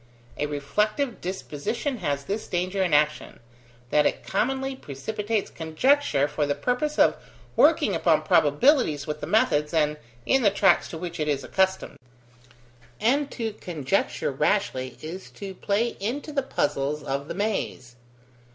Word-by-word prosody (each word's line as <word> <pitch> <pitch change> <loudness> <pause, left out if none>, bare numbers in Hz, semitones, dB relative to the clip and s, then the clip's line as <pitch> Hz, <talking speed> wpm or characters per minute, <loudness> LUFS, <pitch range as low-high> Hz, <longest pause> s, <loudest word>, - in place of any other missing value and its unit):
A 150 - 0
reflective 210 - -1
disposition 190 - -3
has 145 -7 -2
this 205 +2 -3
danger 185 +2 -1
in 180 -3 +1
action, 150 +1 +1 0.5
that 150 - +4
it - - -4
commonly 265 +6 -1
precipitates 210 - -3
conjecture 160 - +2
for 150 0 -1
the 145 - 0
purpose 275 +5 -1
of - - +5 0.4
working - - +4
upon - - +2
probabilities 245 - +3
with 150 0 -5
the - - -4
methods 150 -8 +2
and 150 -1 +2 0.3
in 270 - +3
the 210 - +5
tracks 195 -2 +3
to 165 - -7
which 170 0 -6
it 150 - 0
is 140 -2 0
accustomed: 190 +4 0 1.0
and 275 +6 +2
to 225 -3 -4
conjecture 160 -9 -1
rashly 130 -1 0
is 175 +5 -7
to 195 -1 -8
play 205 +5 0
into 260 +9 -3
the 285 -2 0
puzzles 145 - -1
of 140 +1 -3
the - - -5
maze. 195 - -3
185 Hz, 145 wpm, -25 LUFS, 150-225 Hz, 1.0 s, of